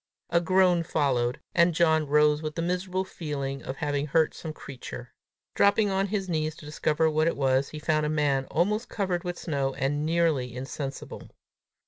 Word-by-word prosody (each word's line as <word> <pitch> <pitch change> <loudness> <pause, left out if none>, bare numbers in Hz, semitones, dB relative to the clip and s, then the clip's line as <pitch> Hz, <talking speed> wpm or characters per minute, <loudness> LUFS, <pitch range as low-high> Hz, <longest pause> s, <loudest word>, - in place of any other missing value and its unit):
A 170 - +3
groan 180 0 +3
followed, 130 -7 0
and 170 -1 +4
John 160 -2 +3
rose 150 +1 +4
with 155 -1 -4
the 165 - -2
miserable 180 +2 -1
feeling 140 -6 -4
of 130 - -5
having 145 0 -1
hurt 160 +2 +2
some 160 - -6
creature. 125 -4 -9 0.4
Dropping 205 0 +3
on 195 +1 +1
his 195 -1 -2
knees 155 -2 -1
to 155 - -13
discover 155 +1 +1
what 155 +1 +2
it 165 - 0
was, 135 0 +2
he 155 - -8
found 155 0 +1
a - - -1
man 145 -3 +1
almost 210 - 0
covered 185 -4 -1
with 175 -1 -4
snow, 140 -4 -2
and 145 +3 -1
nearly 155 -7 +1
insensible. 135 +1 -6
155 Hz, 175 wpm, -27 LUFS, 140-175 Hz, 0.4 s, and